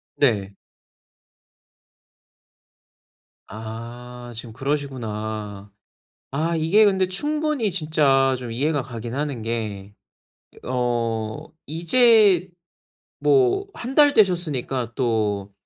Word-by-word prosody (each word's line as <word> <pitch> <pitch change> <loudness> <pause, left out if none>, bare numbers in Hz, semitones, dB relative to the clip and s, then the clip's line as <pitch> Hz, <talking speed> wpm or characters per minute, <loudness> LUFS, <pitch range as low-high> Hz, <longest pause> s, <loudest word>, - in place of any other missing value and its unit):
네. 105 -8 +1 2.9
아. 120 +3 -8
지금 115 0 -8
그러시구나. 110 -7 -4 0.6
아, 160 +5 -1
이게 165 +7 +4
근데 190 -2 +3
충분히 295 +2 -1
진짜 150 -6 +2
좀 125 -2 -7
이해가 145 +4 0
가긴 120 -2 -7
하는 140 -5 -3
게 105 -3 -4 0.7
어 115 -3 -2 0.2
이제 190 - +4 0.7
뭐 390 -1 +3
1 250 +3 -6
달 290 -1 +6
되셨으니까 145 - +1
또 105 -5 -1
130 Hz, 150 characters per minute, -23 LUFS, 115-180 Hz, 2.9 s, 달